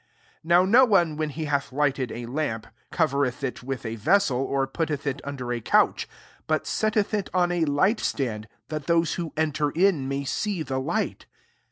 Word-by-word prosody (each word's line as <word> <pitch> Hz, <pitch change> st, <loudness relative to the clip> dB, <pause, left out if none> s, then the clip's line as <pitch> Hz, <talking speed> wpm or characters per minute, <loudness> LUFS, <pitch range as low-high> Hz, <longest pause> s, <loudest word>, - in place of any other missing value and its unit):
16 -, -, -27 dB
^ -, -, -11 dB
Now 175 Hz, +2 st, +6 dB
no 235 Hz, +7 st, +6 dB
one, 175 Hz, -10 st, +3 dB
when 155 Hz, 0 st, -2 dB
he 155 Hz, +2 st, -5 dB
hath 140 Hz, -1 st, -1 dB
lighted 135 Hz, -3 st, 0 dB
a 120 Hz, 0 st, -6 dB
lamp, 120 Hz, -4 st, -3 dB, 0.2 s
covereth 140 Hz, -4 st, 0 dB
it 130 Hz, -, -3 dB
with 130 Hz, -1 st, -5 dB
a 115 Hz, 0 st, -4 dB
vessel, 135 Hz, -, +2 dB
or 135 Hz, 0 st, 0 dB
putteth 150 Hz, +1 st, -3 dB
it 140 Hz, 0 st, -2 dB
under 130 Hz, -4 st, -4 dB
a 120 Hz, -, -3 dB
couch; -, -, +2 dB, 0.4 s
but 155 Hz, 0 st, 0 dB
setteth 215 Hz, -1 st, 0 dB
it 205 Hz, -2 st, -1 dB
on 175 Hz, -1 st, +3 dB
a 175 Hz, -2 st, +1 dB
light*>stand» 140 Hz, -, 0 dB, 0.2 s
that 155 Hz, -2 st, -5 dB
those 170 Hz, -1 st, +2 dB
who 170 Hz, -3 st, -4 dB
enter 150 Hz, -1 st, +1 dB
in 170 Hz, -4 st, +2 dB
may 140 Hz, +1 st, -2 dB
see 185 Hz, +5 st, -2 dB
the 130 Hz, -3 st, -2 dB
light. 130 Hz, -, -2 dB
150 Hz, 190 wpm, -25 LUFS, 135-170 Hz, 0.4 s, Now